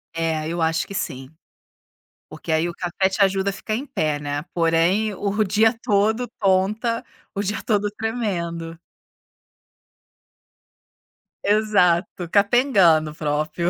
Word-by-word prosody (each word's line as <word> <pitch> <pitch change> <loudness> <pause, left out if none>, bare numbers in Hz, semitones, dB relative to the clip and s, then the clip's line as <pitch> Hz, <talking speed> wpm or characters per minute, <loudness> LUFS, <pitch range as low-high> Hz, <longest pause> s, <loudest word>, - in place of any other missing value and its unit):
É, 160 -1 -1
eu 170 0 -3
acho 160 0 +1
que 200 - -10
sim, 135 -9 -4 1.0
porque 165 - -7
aí, 160 +2 +1
o - - -6
café 185 +2 0
te 190 - -5
ajuda 195 0 +1
a - - -3
ficar 215 - -5
em 275 +5 -5
pé, 155 - -1
né, 145 0 -3
porém 175 +5 +2
o 205 +2 0
dia 220 +4 +3
todo 220 +2 +1
tonta, 210 +5 +1 0.3
o 200 - -2
dia 205 +2 -2
todo 205 -2 +1
tremendo 170 -8 -3 2.7
Exato, 185 -5 +2
capengando 200 - +4
próprio. 155 +3 -1
190 Hz, 125 wpm, -22 LUFS, 165-210 Hz, 2.7 s, capengando